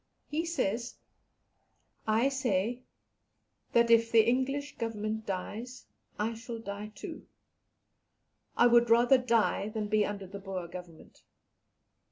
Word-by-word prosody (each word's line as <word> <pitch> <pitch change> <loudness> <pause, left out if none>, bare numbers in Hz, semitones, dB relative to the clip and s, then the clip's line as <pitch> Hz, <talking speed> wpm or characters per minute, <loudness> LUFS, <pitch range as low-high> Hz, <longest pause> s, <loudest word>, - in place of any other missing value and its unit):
He 325 +3 -2
says, 245 - -1 1.1
"I 220 +4 +3
say, 245 -3 -1 0.9
that 235 0 +4
if 230 0 +5
the 225 -1 +5
English 270 +4 0
Government 220 -1 -3
dies 215 +6 -5 0.3
I 220 +2 -1
shall 230 +1 -7
die 210 -1 -6
too; - - -8 1.3
I - - +6
would 240 -1 +5
rather 240 +3 +6
die 230 -4 +1
than 215 -1 -3
be 215 0 +3
under 205 -1 -4
the 200 +2 -8
Boer 190 -3 -5
Government. 175 -2 -11
225 Hz, 120 wpm, -30 LUFS, 205-245 Hz, 1.3 s, I